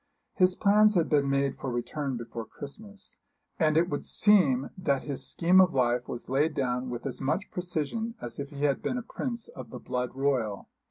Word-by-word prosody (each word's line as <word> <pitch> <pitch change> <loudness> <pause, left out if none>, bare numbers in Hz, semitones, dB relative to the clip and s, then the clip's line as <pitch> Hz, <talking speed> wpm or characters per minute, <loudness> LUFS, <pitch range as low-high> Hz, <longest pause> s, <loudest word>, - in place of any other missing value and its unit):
His 185 -1 +3
plans 210 +1 +4
had 170 -3 +2
been 145 -3 +2
made 140 0 0
for 135 - -3
return 130 +2 -3
before 115 0 -6
Christmas; 200 +8 -9 0.4
and 155 -2 +3
it 170 +1 +4
would 145 -4 -3
seem 155 -12 +4
that 145 -8 0
his 135 -2 -2
scheme 180 +3 +5
of 185 -6 +3
life 125 -1 +1
was 120 - -6
laid 150 +4 +1
down 125 -1 -1
with 120 -1 -5
as - - -4
much 185 +10 -1
precision 180 +7 -3
as 120 +2 -6
if 140 0 -4
he 145 -1 -6
had 140 -2 +2
been 250 - -2
a 245 - -4
prince 235 -1 -5
of 130 -4 -10
the - - -7
blood 125 0 -3
royal. 130 -7 -1
140 Hz, 200 wpm, -28 LUFS, 130-185 Hz, 0.4 s, scheme